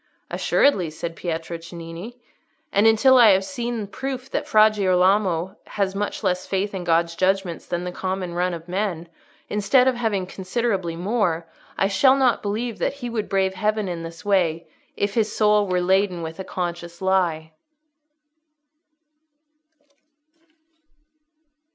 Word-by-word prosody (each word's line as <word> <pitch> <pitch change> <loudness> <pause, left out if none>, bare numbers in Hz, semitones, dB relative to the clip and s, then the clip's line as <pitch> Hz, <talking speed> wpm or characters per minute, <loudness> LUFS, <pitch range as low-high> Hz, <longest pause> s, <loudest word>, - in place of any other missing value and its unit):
"Assuredly," 190 - +2
said 165 +2 -6
Pietro 165 -1 -4
Cennini. 170 +7 -9 0.5
"And 205 +3 +4
until 255 +4 +6
I 230 -3 +8
have 190 +1 +2
seen 240 -4 -3
proof 265 +5 -6
that - - -2
Fra 215 0 +6
Girolamo 190 -2 +1 0.2
has 195 -2 +1
much 205 +2 -3
less 180 -1 0
faith 200 +1 -1
in 190 -2 -4
God's 170 0 +2
judgments 185 -1 -1
than 175 0 -2
the 180 - -4
common 185 -1 -3
run 180 0 0
of 165 +1 -11
men, 180 -3 -2 0.4
instead 210 +6 +3
of 260 - +4
having 220 -6 -1
considerably 190 -2 -2
more, 175 -3 0 0.3
I 195 - +2
shall 260 +7 +4
not 260 -3 +2
believe 220 +3 -3
that - - 0
he 245 -4 -6
would 220 -3 -3
brave 190 -1 +1
Heaven 215 +1 -1
in 175 -2 -4
this 165 +3 -9
way 175 -5 +1 0.3
if 200 0 -1
his 215 -1 0
soul 210 -1 +3
were 180 -1 +1
laden 185 -1 +1
with 160 +2 -7
a - - -3
conscious 175 -2 -5
lie." 175 -4 0
190 Hz, 145 wpm, -23 LUFS, 175-215 Hz, 0.5 s, I